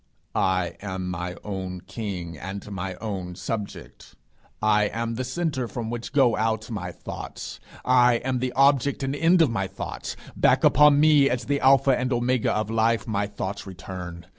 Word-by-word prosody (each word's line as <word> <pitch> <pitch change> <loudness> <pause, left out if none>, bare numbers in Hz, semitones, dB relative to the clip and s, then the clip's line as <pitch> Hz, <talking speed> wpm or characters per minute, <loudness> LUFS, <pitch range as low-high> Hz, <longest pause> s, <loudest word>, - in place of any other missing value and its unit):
I 90 -2 0
am 95 -2 -4
my 90 0 -4
own 95 -3 -5
king 90 -5 -5
and 95 +6 -7
my 95 -1 -4
own 95 -4 -5
subject. 105 +2 -6 0.4
I 105 -1 +3
am 115 +2 -2
the 125 +3 -3
centre 130 -2 -2
from 115 -2 -5
which 120 -1 -5
go 130 -5 +4
out 110 +1 -1
my 90 -5 -4
thoughts; - - -8 0.3
I 125 -1 +5
am 125 +1 -1
the 125 0 -1
object 140 +1 +3
and 135 +1 -1
end 165 +3 +4
of 140 - +1
my 100 -4 -1
thoughts; 95 - -6 0.2
back - - +3
upon 150 +1 +6
me 150 -2 +5
as 125 0 -2
the 145 0 0
alpha 135 0 +5
and 125 +1 -2
omega 120 0 +1
of 110 0 -1
life, 115 -1 +2
my 105 -2 0
thoughts 100 -1 -5
return. 90 -2 -8
110 Hz, 170 wpm, -25 LUFS, 95-130 Hz, 0.4 s, upon